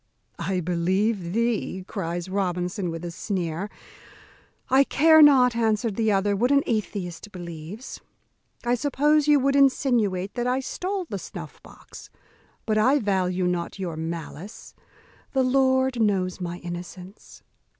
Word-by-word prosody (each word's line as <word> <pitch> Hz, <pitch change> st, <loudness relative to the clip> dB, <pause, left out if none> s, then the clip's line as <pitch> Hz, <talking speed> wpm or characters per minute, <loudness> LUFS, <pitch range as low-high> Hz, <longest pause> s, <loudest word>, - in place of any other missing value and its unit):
"I 190 Hz, -1 st, -1 dB
believe 180 Hz, +3 st, 0 dB
thee," 225 Hz, -4 st, -1 dB
cries 175 Hz, -3 st, -4 dB
Robinson, 180 Hz, -1 st, -2 dB
with 165 Hz, +1 st, -5 dB
a 170 Hz, -, -4 dB
sneer. 180 Hz, 0 st, -3 dB, 1.0 s
"I 270 Hz, +1 st, +5 dB
care 315 Hz, +3 st, +5 dB
not," 260 Hz, -5 st, +6 dB
answered 220 Hz, -2 st, 0 dB
the 220 Hz, -1 st, +1 dB
other, 200 Hz, +1 st, +1 dB
"what 240 Hz, +5 st, +1 dB
an 280 Hz, 0 st, +4 dB
atheist 205 Hz, -3 st, -3 dB
believes. 175 Hz, +5 st, -8 dB, 0.6 s
I 240 Hz, -, +2 dB
suppose 295 Hz, +3 st, +2 dB
you 295 Hz, -1 st, +6 dB
would 275 Hz, +1 st, +1 dB
insinuate 235 Hz, -9 st, +2 dB
that 245 Hz, 0 st, -2 dB
I 255 Hz, +1 st, +1 dB
stole 370 Hz, +8 st, -3 dB
the 200 Hz, -7 st, -4 dB
snuff -, -, -9 dB
box; -, -, -14 dB, 0.6 s
but 215 Hz, -1 st, +1 dB
I 260 Hz, +7 st, +4 dB
value 185 Hz, -5 st, 0 dB
not 180 Hz, 0 st, -2 dB
your 180 Hz, -4 st, -4 dB
malice; 165 Hz, +4 st, -7 dB, 0.6 s
the 265 Hz, -1 st, +3 dB
Lord 260 Hz, -1 st, +2 dB
knows 190 Hz, -4 st, 0 dB
my 175 Hz, -1 st, -4 dB
innocence." 180 Hz, +3 st, -9 dB
205 Hz, 135 wpm, -25 LUFS, 180-255 Hz, 1.0 s, not